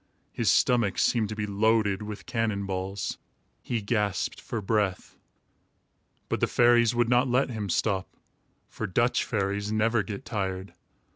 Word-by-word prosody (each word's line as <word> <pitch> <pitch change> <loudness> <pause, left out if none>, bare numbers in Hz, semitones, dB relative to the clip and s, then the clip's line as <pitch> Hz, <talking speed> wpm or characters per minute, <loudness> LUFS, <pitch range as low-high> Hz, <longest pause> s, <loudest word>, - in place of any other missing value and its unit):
His - - 0
stomach 120 -6 +3
seemed 110 -4 +2
to 110 - -4
be 105 0 -2
loaded 105 -1 +2
with 105 0 -7
cannon 110 -4 -1
balls. 95 +1 -3 0.4
He 115 -4 -3
gasped 105 -2 -1
for 115 - -4
breath. 100 -2 -1 1.1
But - - -1
the - - +2
fairies 120 -1 +4
would 120 -1 +2
not 125 +2 +3
let 125 +1 +1
him 105 -4 -4
stop, 95 +1 -1 0.5
for - - -5
Dutch 120 +7 +1
fairies 100 -1 -2
never 110 +1 +2
get 100 -1 -7
tired. 95 -2 -3
105 Hz, 145 wpm, -27 LUFS, 100-115 Hz, 1.1 s, fairies